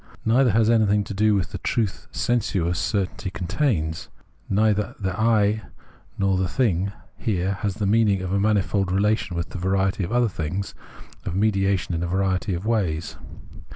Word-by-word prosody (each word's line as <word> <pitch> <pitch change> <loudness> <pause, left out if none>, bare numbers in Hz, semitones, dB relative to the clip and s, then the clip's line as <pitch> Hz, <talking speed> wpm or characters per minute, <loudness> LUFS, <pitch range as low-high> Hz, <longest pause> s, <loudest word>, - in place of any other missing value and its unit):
Neither 125 +3 +4
has 110 +1 +3
anything 105 -3 +3
to 100 - -7
do 105 +1 +3
with 95 -3 -1
the - - -5
truth 110 -5 -2
sensuous 95 -8 0
certainty 95 -2 -2
contains: 90 - -1 0.4
neither 105 0 +1
the 95 -2 -2
I 110 -1 +2 0.6
nor 95 -1 +2
the 95 0 +1
thing 95 -6 +1 0.3
has - - -17
here 95 -1 0
the 105 0 -1
meaning 100 -2 +3
of 95 0 -3
a 100 - +2
manifold 100 -2 +1
relation 100 -2 +1
with 85 - -4
a 95 - -4
variety 95 +2 +1
of 85 - -4
other 120 0 +3
things, 90 +1 -4 0.5
of 85 - -4
mediation 95 -3 +1
in 85 - -1
a 85 - -1
variety 95 +1 0
of 90 +4 -5
ways. 90 -9 -1
100 Hz, 165 wpm, -24 LUFS, 95-110 Hz, 0.6 s, Neither